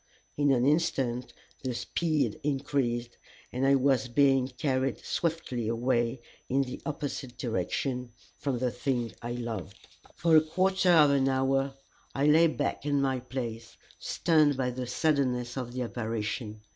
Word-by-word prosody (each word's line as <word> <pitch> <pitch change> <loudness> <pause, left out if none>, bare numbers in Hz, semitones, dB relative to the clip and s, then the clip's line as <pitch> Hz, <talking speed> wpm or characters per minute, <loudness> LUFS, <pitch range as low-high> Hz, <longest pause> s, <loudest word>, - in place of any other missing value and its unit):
In 145 -1 +2
an 125 -2 +3
instant 135 -5 +1 0.3
the 130 -2 -2
speed 155 +5 -1
increased, 135 -4 -1 0.3
and 130 +2 0
I 140 - +6
was 135 -1 +2
being 135 +1 +3
carried 130 -1 -1
swiftly 155 -9 -2
away 120 +1 0 0.3
in 135 +2 +2
the 125 -1 -7
opposite 140 -4 -4
direction 125 +3 -2 0.2
from 140 -3 -2
the 125 0 0
thing 125 -1 -2
I 120 +1 -4
loved. 115 -8 -6 0.3
For 165 -1 +3
a 155 - +8
quarter 185 +4 +1
of 155 -4 +7
an 135 -1 +3
hour 135 +1 +1 0.4
I 140 - +1
lay 160 +3 +6
back 145 -3 -2
in 145 -1 +1
my 135 -2 +1
place, 120 -3 -6 0.2
stunned 155 -4 +2
by 125 -1 0
the 125 0 -5
suddenness 125 -3 0
of 125 -3 -4
the 125 0 -2
apparition. 110 -1 -4
130 Hz, 145 wpm, -29 LUFS, 120-145 Hz, 0.4 s, a